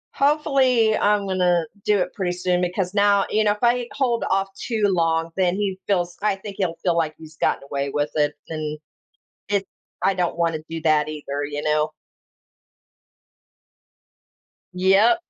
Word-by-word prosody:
Hopefully, 270 -6 +3
I'm 205 -1 +2
gonna, 180 -3 +2 0.2
do 210 -1 +3
it - - -2
pretty 180 -3 -2
soon 180 0 0
because 180 +1 -1
now 200 -1 +4
you 215 0 +3
know, 205 - +3
if 210 +3 -4
I 240 0 +2
hold 245 -4 0
off 195 0 +1
too 220 +1 -3
long, 165 -3 +1
then 185 -1 +2
he 195 -2 -2
feels 175 -3 0
I 210 -2 +2
think 200 +1 -9
he'll 175 -3 0
feel 175 -2 +2
like 155 -2 0
he's 155 -1 -13
gotten - - 0
away 140 0 -3
with 145 +1 -1
it, 150 -1 +2 0.2
and 155 -1 -4 0.7
it 200 -1 0 0.4
I 195 +1 +3
don't 180 -2 -1
wanna 165 -2 0
do 165 0 -5
that 155 -1 +3
either, 145 -2 -4
you 145 0 -4
know? 155 0 +1 2.8
Yep. 195 - +4
185 Hz, 160 wpm, -23 LUFS, 160-205 Hz, 2.8 s, now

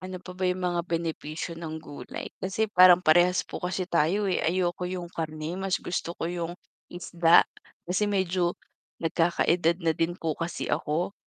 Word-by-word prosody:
Ano 185 0 -6
pa 180 - -8
ba 185 0 -1
yung 180 0 -2
mga 175 -1 +1
benepisyo 165 -1 -3
ng 160 -1 -5
gulay 145 - -8
kasi 195 +4 0
parang 180 -2 +7
parehas 175 +3 +4
po - - -7
kasi 185 +1 -2
tayo, 175 +4 +1
eh, - - +1
ayoko 180 +1 0
yung 180 -2 -5
karne 155 0 -4
mas 190 -1 0
gusto 175 -1 -4
ko - - -4
yung 175 -1 -3 0.4
isda 175 -1 +4 0.4
kasi 185 +4 0
medyo 185 -3 0 0.5
nagkakaedad 170 0 +2
na 165 - +3
din 165 +2 -1
po 165 -3 -2
kasi 165 +1 -3
ako. 165 +6 -1
175 Hz, 165 wpm, -27 LUFS, 165-185 Hz, 0.5 s, parang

